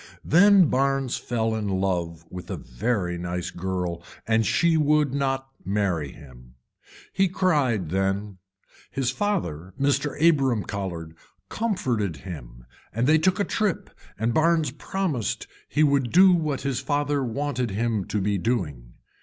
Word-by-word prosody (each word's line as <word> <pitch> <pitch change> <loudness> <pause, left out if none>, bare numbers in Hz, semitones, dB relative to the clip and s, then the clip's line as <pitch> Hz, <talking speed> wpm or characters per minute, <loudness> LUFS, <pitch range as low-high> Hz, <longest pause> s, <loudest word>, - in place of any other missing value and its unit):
Then 195 +3 +6
Barnes 135 -2 +1
fell 115 -2 -1
in 110 -2 -2
love 90 -4 -1
with 90 -1 -8
a - - -3
very 90 - -2
nice 90 0 -3
girl 90 -2 -3 0.3
and 110 -1 +2
she 170 -1 +3
would 150 -2 +3
not 135 -1 -1
marry 95 -7 -1
him. 60 -3 -15 0.6
He 195 - +3
cried 145 - +1
then, 95 +1 -1 0.5
his 130 -1 -1
father 110 - -2
Mr. 140 +1 +1
Abram 135 -9 +3
Colhard 85 -6 -5 0.4
comforted 125 - -1
him - - -10 0.3
and 115 +3 0
they 155 +3 +5
took 185 +5 +2
a - - +3
trip 210 -6 -1 0.3
and 115 +1 0
Barnes 160 +2 +2
promised 170 - -2 0.2
he 150 - +2
would 140 -4 +2
do 185 +1 +7
what 155 -5 0
his 135 -2 -1
father 145 0 0
wanted 125 0 -2
him 110 -1 -1
to 105 - -2
be 100 0 0
doing. 75 - -2
120 Hz, 140 wpm, -25 LUFS, 95-145 Hz, 0.6 s, do